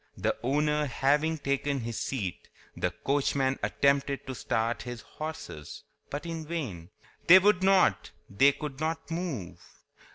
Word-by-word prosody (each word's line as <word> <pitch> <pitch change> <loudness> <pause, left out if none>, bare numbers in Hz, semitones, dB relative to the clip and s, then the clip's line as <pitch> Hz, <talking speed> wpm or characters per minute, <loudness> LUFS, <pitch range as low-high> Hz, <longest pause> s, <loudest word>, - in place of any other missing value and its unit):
The - - 0
owner 150 +3 +1
having 145 +5 +1
taken 140 -1 -1
his 115 -1 -4
seat, 100 -10 -4 0.3
the - - 0
coachman 135 -1 0
attempted 140 0 +1
to 130 - -5
start 115 -1 -1
his 120 -2 -6
horses, 155 - -8 0.3
but 145 +4 -5
in 165 -1 -4
vain. 130 - -5 0.4
They 180 +2 +11
would 190 0 +4
not—they 145 - +3
could 145 -2 -6
not 160 +1 -3
move. 165 - -4
140 Hz, 130 wpm, -29 LUFS, 125-160 Hz, 0.4 s, They